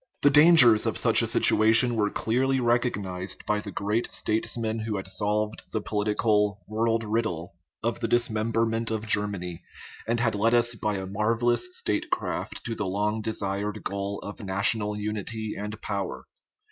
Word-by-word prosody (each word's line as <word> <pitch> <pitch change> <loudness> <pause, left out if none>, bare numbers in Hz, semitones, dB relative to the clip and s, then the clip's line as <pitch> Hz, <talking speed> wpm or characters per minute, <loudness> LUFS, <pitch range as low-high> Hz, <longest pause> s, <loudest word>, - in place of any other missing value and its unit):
The 145 - +6
dangers 150 -7 +7
of - - -1
such - - +6
a - - 0
situation 115 +3 +4
were 105 -2 +1
clearly 130 +6 0
recog 120 0 +1
nized 95 -1 -5
by 105 0 0
the 105 - -8
great 105 +5 -2
statesman 110 +1 -1
who 110 -1 -3
had 95 - -5
solved 105 +2 -1
the 110 - -1
po 105 0 -5
litical 105 -1 +1
" - - -39
world 115 +1 0
riddle 105 -7 -2 0.2
" - - -46
of 115 0 -1
the 115 - -1
dismemberment 115 0 0
of 110 -1 -3
Ger 105 -1 +1
many, 90 -4 -6 0.5
and 115 +1 0
had 115 -2 +1
led 115 +3 +2
us 120 0 +3
by 105 -2 -2
a 95 -1 -4
marvellous 115 - 0
statecraft 105 - -3
to 115 - -3
the 105 -3 -3
long 105 +3 -1
desired 105 -1 -3
goal 100 0 -4
of 105 - -8
national 105 +1 +1
unity 105 +1 -4
and 105 +2 -6
power. 100 -3 -4
110 Hz, 170 wpm, -26 LUFS, 105-115 Hz, 0.5 s, dangers